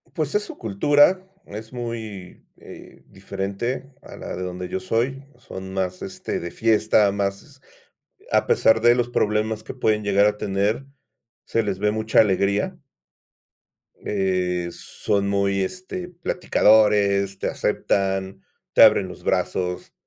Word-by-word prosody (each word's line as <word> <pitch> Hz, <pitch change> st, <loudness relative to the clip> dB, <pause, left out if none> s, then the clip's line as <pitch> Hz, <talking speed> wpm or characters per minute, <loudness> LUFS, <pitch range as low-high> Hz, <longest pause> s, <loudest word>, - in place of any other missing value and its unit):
Pues 155 Hz, -1 st, -2 dB
es 210 Hz, -, +2 dB
su -, -, -10 dB
cultura, 145 Hz, -, +3 dB, 0.2 s
es 110 Hz, +3 st, -9 dB
muy, 110 Hz, -6 st, -7 dB
eh, -, -, -14 dB
diferente 100 Hz, +7 st, -4 dB
a -, -, -12 dB
la -, -, -7 dB
de 90 Hz, -, -5 dB
donde 90 Hz, 0 st, -5 dB
yo 95 Hz, -, -3 dB
soy. 125 Hz, +8 st, -1 dB, 0.2 s
Son 95 Hz, -5 st, -9 dB
más, 90 Hz, -1 st, -2 dB
este, -, -, -5 dB
de 85 Hz, -, -5 dB
fiesta, 110 Hz, -2 st, +3 dB
más, 100 Hz, -1 st, -4 dB, 0.7 s
a -, -, +3 dB
pesar 110 Hz, 0 st, +4 dB
de 120 Hz, +1 st, +5 dB
los 120 Hz, -1 st, 0 dB
problemas 110 Hz, 0 st, 0 dB
que -, -, -8 dB
pueden 105 Hz, -1 st, +1 dB
llegar 100 Hz, 0 st, +3 dB
a 105 Hz, -, +1 dB
tener, 100 Hz, +6 st, -1 dB, 0.6 s
se 115 Hz, -, 0 dB
les 100 Hz, -3 st, -3 dB
ve 105 Hz, +1 st, +1 dB
mucha 110 Hz, 0 st, +2 dB
alegría. 100 Hz, 0 st, +1 dB, 1.1 s
Eh, 90 Hz, -3 st, -1 dB
son 100 Hz, +2 st, -2 dB
muy, 100 Hz, 0 st, +1 dB
este, 185 Hz, -, -5 dB
platicadores, 105 Hz, -, +2 dB
te -, -, -2 dB
aceptan, 95 Hz, -1 st, -1 dB, 0.3 s
te -, -, +6 dB
abren -, -, +6 dB
los -, -, -11 dB
brazos, 90 Hz, -1 st, -1 dB
105 Hz, 140 wpm, -23 LUFS, 95-115 Hz, 1.1 s, te